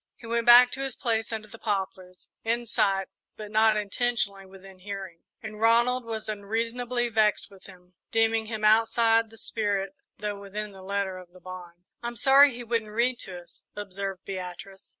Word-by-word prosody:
He 230 - -14
went 235 +1 -1
back 245 +1 +9
to 270 - -4
his 270 -1 -4
place 225 -1 -1
under 220 -1 -5
the 225 - -13
poplars, 190 -3 -4 0.2
in 235 +1 -1
sight, 195 -4 +1 0.3
but 210 -1 -8
not 220 0 +4
intentionally 205 -2 -1
within 190 0 -14
hearing, 190 -3 -8 0.2
and 215 0 -8
Ronald 240 +2 +3
was 220 -1 -5
unreasonably 230 +4 -2
vexed 215 -3 +1
with 195 -1 -17
him, 180 -1 -17 0.2
deeming 225 0 +2
him 215 -1 -3
outside 225 +1 +4
the 225 - -16
spirit, 205 -1 -1 0.2
though 205 -1 -4
within 205 +1 -6
the 190 -1 -13
letter 195 -1 -2
of 180 -1 -15
the 185 - -15
bond. 180 -1 -10 0.2
"I'm 235 0 -4
sorry 275 +4 +6
he 245 - -7
wouldn't 230 -2 -1
read 235 +3 0
to 180 -2 -6
us," 175 - -13
observed 195 -2 -5
Beatrice. 190 0 -7
215 Hz, 175 wpm, -27 LUFS, 195-230 Hz, 0.3 s, back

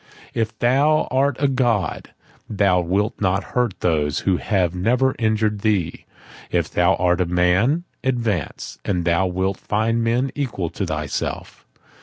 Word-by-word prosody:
"If 110 -1 -2
thou 140 +6 +3
art 135 0 +2
a 140 - +3
god, 120 -6 0 0.4
thou 100 -4 +2
wilt 100 +6 -1
not 95 0 +1
hurt 125 -6 0
those 75 -4 +1
who 95 -2 +1
have 90 -4 0
never 125 +8 +1
injured 110 -2 +1
thee; 100 -6 -1 0.4
if - - -1
thou 90 +2 +3
art 90 0 +1
a - - +2
man, 90 - +2 0.2
advance:—and 105 - -2
thou 90 +2 +2
wilt 95 +1 -1
find 115 +2 0
men 120 +3 +1
equal 110 - -3
to - - -3
thyself." - - -4
105 Hz, 140 wpm, -21 LUFS, 90-120 Hz, 0.4 s, thou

